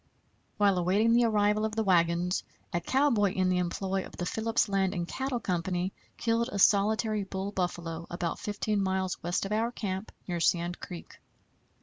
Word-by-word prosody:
While 200 -3 +3
awaiting 200 +6 +3
the 240 0 +5
arrival 210 -1 +2
of 220 0 -1
the 220 - +1
wagons, 175 -1 +2 0.3
a 175 - 0
cowboy 235 -8 +2
in 185 -1 +2
the 180 0 +2
employ 190 +2 -1
of - - -12
the 175 - -2
Phillips 225 +4 +1
Land 195 -1 +1
and 175 -1 -2
Cattle 265 +2 -2
Company 180 -1 -1 0.2
killed 235 +1 +1
a - - -3
solitary 210 +2 +3
bull 195 +1 -4
buffalo 170 -3 -3
about 175 -1 -3
15 210 -1 -1
miles 190 -1 -1
west 175 +3 -1
of 195 - -5
our 225 +2 +1
camp, 195 -3 -4 0.2
near 175 -2 -2
Sand 175 +1 +1
Creek. 175 -2 -9
195 Hz, 175 wpm, -29 LUFS, 180-215 Hz, 0.3 s, the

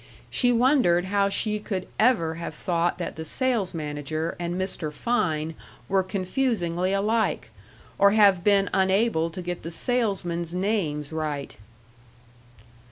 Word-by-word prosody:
She 245 -1 +3
wondered 240 -8 +3
how 200 +1 +1
she 210 +1 -1
could 195 -3 -4
ever 215 -9 +3
have 165 -1 -6
thought 170 +1 0
that 175 - -5
the 160 - -4
sales 230 -1 -1
manager 155 +1 -3
and 175 +1 -3
Mr. 185 -5 -2
Fein 160 -5 -1 0.3
were 195 0 +2
confusingly 185 -2 -1
alike, 210 - 0 0.5
or 200 0 +7
have 200 -4 +4
been 200 0 +4
unable 190 -3 +2
to 180 +2 -7
get 175 0 -4
the 165 - -6
salesmen's 175 -5 -1
names 180 -7 -1
right. 150 -3 -4
185 Hz, 130 wpm, -25 LUFS, 165-210 Hz, 0.5 s, or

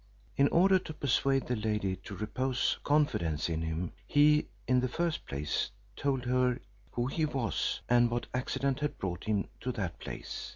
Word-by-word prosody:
In 140 - +5
order 190 +4 +5
to 155 - -8
persuade 135 -1 +2
the 125 - 0
lady 105 -3 0
to 100 - -6
repose 125 +5 0
confidence 85 - +1
in 80 -1 -1
him, 80 +2 -2 0.2
he, 150 +1 +5 0.2
in 125 0 +4
the 130 - +1
first 170 +5 -2
place, 70 +2 -1 0.3
told 135 -3 0
her 125 0 +2 0.3
who 120 - 0
he 145 +5 -1
was, 135 -8 0
and 120 0 +5
what 120 +1 -1
accident 130 +2 0
had 150 0 -2
brought 90 -3 -4
him 105 -2 +1
to 125 - -2
that 95 -8 -3
place. - - -6
125 Hz, 170 wpm, -31 LUFS, 105-140 Hz, 0.3 s, In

